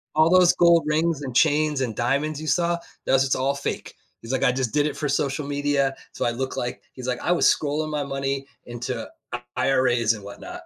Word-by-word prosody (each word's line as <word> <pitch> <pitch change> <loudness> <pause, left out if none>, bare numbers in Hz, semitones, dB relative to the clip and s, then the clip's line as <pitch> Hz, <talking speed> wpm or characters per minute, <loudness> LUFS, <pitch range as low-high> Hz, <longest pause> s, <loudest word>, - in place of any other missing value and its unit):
"All 155 +1 +5
those 180 -1 +6
gold 170 -1 +5
rings 155 0 +1
and 130 -3 -6
chains 150 -2 +3
and 115 -5 -2
diamonds 140 +5 0
you 155 - -6
saw, 170 0 +1 0.3
that - - +1
was 135 0 +5
just 135 - +1
all 135 +2 0
fake." 140 - -5 0.3
He's 115 - -7
like, 130 - 0
"I 125 - +5
just 125 -3 -2
did 145 0 +3
it 150 - -2
for 150 -2 -2
social 140 0 -1
media, 145 -1 0 0.2
so - - -4
I - - +2
look 130 +3 -3
like" 120 - -4
He's 130 -1 -8
like, 125 - -1
"I - - 0
was 175 - +4
scrolling 155 +1 -1
my 150 -1 -2
money 135 0 -3 0.2
into 120 0 -5 0.5
IRAs 120 -4 +2
and 105 -2 -9
whatnot." 100 0 -9
140 Hz, 220 wpm, -24 LUFS, 130-155 Hz, 0.5 s, those